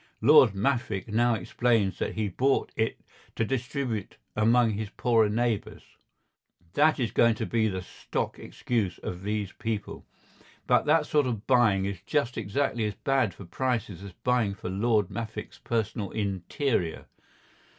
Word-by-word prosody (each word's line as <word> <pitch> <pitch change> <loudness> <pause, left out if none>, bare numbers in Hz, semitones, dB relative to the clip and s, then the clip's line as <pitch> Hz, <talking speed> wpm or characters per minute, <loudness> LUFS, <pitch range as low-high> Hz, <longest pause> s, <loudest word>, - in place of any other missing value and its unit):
Lord 100 - +6
Maffick 110 -2 -1
now 120 +2 +3
explains 110 0 0
that - - -2
he 110 -1 0
bought 130 +8 +1
it 110 0 -1 0.3
to 115 - 0
distribute 125 -4 -3 0.2
among 115 +2 +4
his 105 0 -4
poorer 115 -2 +2
neighbours—that 115 - -2
is 120 -3 0
going 115 -1 +4
to - - -3
be 110 -2 +1
the 95 -3 -3
stock - - -4
excuse 110 -7 -2
of 90 0 -5
these 105 -1 -2
people—but 110 -2 -4
that 160 +2 +4
sort 145 -3 +2
of 115 -4 -3
buying 110 -7 +3
is 100 -3 -4
just 140 -5 -1
exactly 115 +2 -1
as 105 -1 -3
bad 135 -7 0
for 100 - -10
prices 115 -1 -2
as 100 -2 -9
buying 120 -5 +1
for 95 - -6
Lord 105 0 +1
Maffick's 110 -2 -6
personal 110 -3 -2
interior. 100 - -2
110 Hz, 140 wpm, -27 LUFS, 100-120 Hz, 0.3 s, Lord